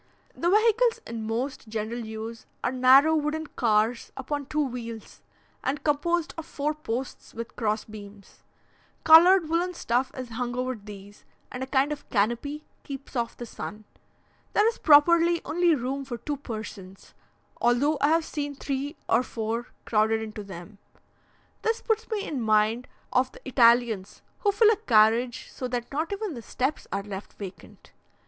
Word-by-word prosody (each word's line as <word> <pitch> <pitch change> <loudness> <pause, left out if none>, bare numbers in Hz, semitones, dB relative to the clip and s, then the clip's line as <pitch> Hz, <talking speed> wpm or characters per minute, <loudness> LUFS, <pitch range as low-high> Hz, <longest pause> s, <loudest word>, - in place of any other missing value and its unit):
The 340 - 0
vehicles 455 +4 +3
in 225 -1 -5
most 235 +2 -3
general 220 +2 -3
use 220 0 -7 0.2
are - - +1
narrow, 265 +5 +6
wooden 310 +1 -1
cars 230 -3 0
upon 280 +1 -4
two 300 0 0
wheels, 230 -3 -7 0.4
and 280 +3 -2
composed 325 +3 0
of 325 - -8
four 300 +1 -2
posts 265 -4 -5
with 230 +1 -7
cross 215 -2 -1
beams. 205 -2 -12 0.6
Coloured 335 +2 +8
woollen 345 +3 0
stuff 250 -3 0
is 255 -2 -5
hung 245 +1 -3
over 255 +1 -1
these, 205 -2 -12 0.3
and 250 - -6
a 260 - -3
kind 270 +2 +2
of 295 - -6
canopy 240 +8 -1 0.2
keeps 275 -1 -9
off 235 -1 -2
the 240 - -6
sun. 215 -1 -8 0.7
There 420 - +4
is 460 - -1
properly 335 +3 +6
only 340 0 +3
room 270 +2 -3
for 255 -3 -6
two 290 +5 -4
persons, 215 -7 -8 0.4
although 265 +5 +2
I 285 - +5
have 325 +1 +3
seen 290 -2 -4
three 280 +2 -3
or - - +4
four 230 -1 -3 0.2
crowded 220 0 +2
into 215 -1 -7
them. 195 +1 -10 0.8
This 450 +1 0
put 445 -2 -1
me 420 -2 -1
in 275 -5 -3
mind 220 +2 +2 0.3
of 255 +1 +2
the - - -14
Italians, 235 -5 +3 0.2
who 410 -4 +2
fill 435 +2 +5
a 440 - +1
carriage 230 0 +3
so 255 - -5
that 245 -1 -4
not 310 +5 -2
even 400 -2 -3
the 240 - -7
steps 260 +6 -2
are 195 +1 -2
left 200 -1 -8
vacant. 195 -2 -11
255 Hz, 160 wpm, -26 LUFS, 225-300 Hz, 0.8 s, Coloured